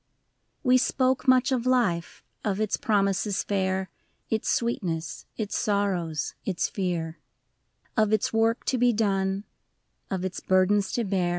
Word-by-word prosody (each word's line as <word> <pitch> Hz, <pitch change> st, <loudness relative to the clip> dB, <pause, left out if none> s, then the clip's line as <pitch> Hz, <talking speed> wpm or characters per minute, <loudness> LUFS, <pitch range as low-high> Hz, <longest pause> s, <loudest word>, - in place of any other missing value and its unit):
II. -, -, -48 dB
We 255 Hz, -2 st, +5 dB
spoke 260 Hz, +1 st, +1 dB
much 255 Hz, +2 st, +5 dB
of 255 Hz, -1 st, 0 dB
life, 215 Hz, -10 st, +1 dB, 0.2 s
of 205 Hz, -1 st, -1 dB
its 215 Hz, -2 st, +1 dB
promises 200 Hz, -1 st, +1 dB
fair. 190 Hz, -1 st, -1 dB, 0.4 s
Its 220 Hz, -1 st, 0 dB
sweetness, 170 Hz, -10 st, -2 dB
its 210 Hz, -3 st, -3 dB
sorrows, 185 Hz, -7 st, 0 dB
its 185 Hz, -4 st, -1 dB
fear: 170 Hz, -4 st, -3 dB, 0.8 s
Of 215 Hz, -2 st, +3 dB
its 215 Hz, 0 st, +1 dB
work 225 Hz, +1 st, +2 dB
to 255 Hz, -, 0 dB
be 245 Hz, 0 st, +4 dB
done, 195 Hz, -2 st, 0 dB, 0.7 s
of 190 Hz, -1 st, -2 dB
its 185 Hz, -1 st, -4 dB
burdens 190 Hz, +2 st, +2 dB
to 240 Hz, -, 0 dB
bear. 190 Hz, -4 st, 0 dB
200 Hz, 140 wpm, -26 LUFS, 185-230 Hz, 0.8 s, We